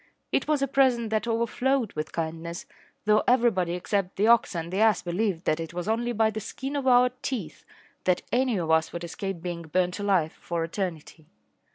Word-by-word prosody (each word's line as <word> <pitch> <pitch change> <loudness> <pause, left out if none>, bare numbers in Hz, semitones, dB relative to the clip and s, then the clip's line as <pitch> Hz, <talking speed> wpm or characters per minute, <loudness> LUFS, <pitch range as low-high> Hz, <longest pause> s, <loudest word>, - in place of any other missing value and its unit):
It - - +1
was 300 -2 +2
a - - +1
present 250 -4 +2
that 220 +1 0
overflowed 235 +1 0
with 155 +1 -4
kindness, 165 +1 -4 0.4
though 215 0 +4
everybody 230 -9 +3
except 190 +1 -2
the 205 - +2
ox 230 -4 +4
and 170 +1 -4
the 195 - 0
ass 220 -1 +4
believed 180 0 -1
that 155 - +1
it 165 +1 -6
was 175 +2 -3
only 235 +2 0
by 220 -1 +2
the 215 - -4
skin 270 +6 -5
of 275 -2 -1
our 250 0 +6
teeth 205 - -4 0.4
that 180 -1 +2
any 250 -3 +2
of 165 -3 -1
us 160 0 +3
would 170 - -6
escape 175 +1 -5
being 175 -2 -4
burnt 180 +3 -1
alive 190 -6 +2
for 170 -1 -3
eternity. 165 -3 -5
195 Hz, 195 wpm, -27 LUFS, 170-235 Hz, 0.4 s, our